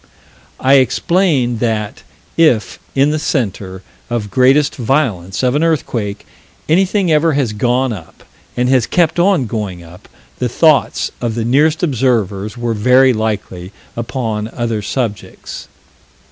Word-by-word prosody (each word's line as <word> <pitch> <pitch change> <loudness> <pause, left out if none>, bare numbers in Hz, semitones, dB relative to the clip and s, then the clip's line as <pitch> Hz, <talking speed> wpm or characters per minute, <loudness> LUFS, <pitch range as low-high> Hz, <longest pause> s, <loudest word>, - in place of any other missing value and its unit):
I 135 +1 +5
explain 130 - +1
that, 110 -3 -2 0.3
if 125 - +2 0.2
in 140 +2 +3
the 155 - -1
center 100 - -3 0.3
of 110 -4 -3
greatest 135 +3 +3
violence 110 - -1
of 125 -1 +2
an 150 +3 +1
earthquake, 120 -10 -2 0.4
anything 190 +2 +2
ever 155 +1 +3
has 135 -6 0
gone 125 +3 0
up, 85 -6 -12 0.3
and 125 0 +1
has 130 -2 +2
kept 170 -1 +1
on 175 -6 +3
going 100 -6 -5
up, 85 +2 -15 0.3
the 125 - -1
thoughts 155 +4 +2
of 115 -2 -2
the 115 -1 -2
nearest 150 +7 +2
observers 115 - 0
were 120 -1 -2
very 125 +4 +4
likely 105 -5 -4 0.2
upon 115 -3 -3
other 115 -2 -3
subjects. 105 -3 -5
125 Hz, 130 wpm, -16 LUFS, 105-145 Hz, 0.4 s, I